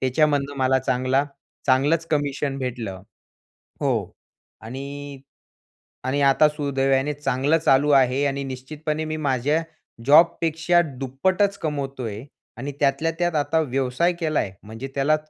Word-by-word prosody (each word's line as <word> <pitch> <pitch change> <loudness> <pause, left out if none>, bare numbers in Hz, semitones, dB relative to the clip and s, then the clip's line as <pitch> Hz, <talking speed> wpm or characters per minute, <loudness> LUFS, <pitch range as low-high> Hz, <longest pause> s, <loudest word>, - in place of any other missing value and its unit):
त्याच्यामधनं 140 +1 +1
मला 130 0 +3
चांगला 130 +1 +1 0.4
चांगलंच 145 +5 +3
कमिशन 145 -2 -1
भेटलं 115 -8 -5 0.8
हो - - +2 0.7
आणि 140 +3 -7 0.8
आणि 135 +2 0
आता 140 +2 +5
सुदैवाने 140 -1 0
चांगलं 145 +2 +1
चालू 145 -1 +3
आहे 135 0 +4
आणि 140 0 -2
निश्चितपणे 150 +4 -4
मी 155 0 -3
माझ्या 145 +2 0 0.4
जॉबपेक्षा 165 +2 +4 0.2
दुप्पटच 185 +10 +1
कमवतो 140 -4 -3
आहे 110 +3 -6 0.3
आणि 140 +4 -5
त्यातल्या 140 +3 +2
त्यात 175 -1 0
आता 160 +2 +1
व्यवसाय 135 +4 0
केला 155 -2 +1
आहे. 95 - -3
म्हणजे 110 +5 -8
त्याला 145 +3 +3
140 Hz, 120 wpm, -23 LUFS, 130-155 Hz, 0.8 s, आता